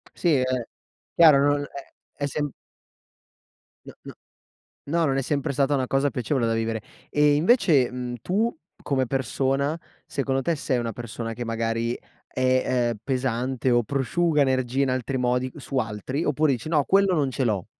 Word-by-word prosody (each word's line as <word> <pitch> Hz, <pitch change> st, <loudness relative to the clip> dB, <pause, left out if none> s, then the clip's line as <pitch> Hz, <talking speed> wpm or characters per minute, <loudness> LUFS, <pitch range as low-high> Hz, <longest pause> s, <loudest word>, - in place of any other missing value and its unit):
Sì, 170 Hz, -3 st, +2 dB
è 130 Hz, -, +2 dB, 0.7 s
chiaro, 145 Hz, -4 st, +7 dB
non 145 Hz, 0 st, 0 dB
è 140 Hz, -1 st, -9 dB, 0.3 s
è -, -, +2 dB
sem 145 Hz, 0 st, -2 dB, 1.3 s
No, -, -, -10 dB
no, -, -, -9 dB, 0.7 s
no 165 Hz, +3 st, +1 dB
non 135 Hz, -2 st, +1 dB
è -, -, +1 dB
sempre 145 Hz, +2 st, -1 dB
stata 140 Hz, +1 st, +1 dB
una 130 Hz, -2 st, 0 dB
cosa 135 Hz, +2 st, +1 dB
piacevole 125 Hz, -1 st, -1 dB
da 115 Hz, -, +1 dB
vivere. 115 Hz, -1 st, -2 dB, 0.3 s
E 150 Hz, 0 st, +4 dB
invece, 160 Hz, -, +4 dB
mhmm, 125 Hz, -1 st, -5 dB
tu 215 Hz, +6 st, 0 dB, 0.3 s
come 130 Hz, -2 st, 0 dB
persona, 135 Hz, +4 st, 0 dB, 0.3 s
secondo 135 Hz, -1 st, -1 dB
te 170 Hz, +2 st, +1 dB
sei 130 Hz, -3 st, -1 dB
una 115 Hz, -1 st, -2 dB
persona 115 Hz, 0 st, -6 dB
che 120 Hz, +1 st, -5 dB
magari 115 Hz, +1 st, -1 dB, 0.3 s
è, 130 Hz, -1 st, +1 dB
uhm, 105 Hz, -, -9 dB
pesante 130 Hz, -1 st, -1 dB
o 120 Hz, 0 st, +4 dB
prosciuga 150 Hz, +5 st, +1 dB
energia 130 Hz, 0 st, +1 dB
in 135 Hz, -, +1 dB
altri 130 Hz, +1 st, -2 dB
modi 125 Hz, +1 st, 0 dB
su 140 Hz, -1 st, -6 dB
altri, 115 Hz, -, -2 dB
oppure 150 Hz, 0 st, +2 dB
dici: 125 Hz, +5 st, -4 dB
"No, 150 Hz, -4 st, +2 dB
quello 195 Hz, -1 st, +3 dB
non 140 Hz, -4 st, +1 dB
ce 130 Hz, +1 st, -1 dB
l'ho". 100 Hz, -6 st, -1 dB
135 Hz, 170 wpm, -25 LUFS, 120-145 Hz, 1.3 s, chiaro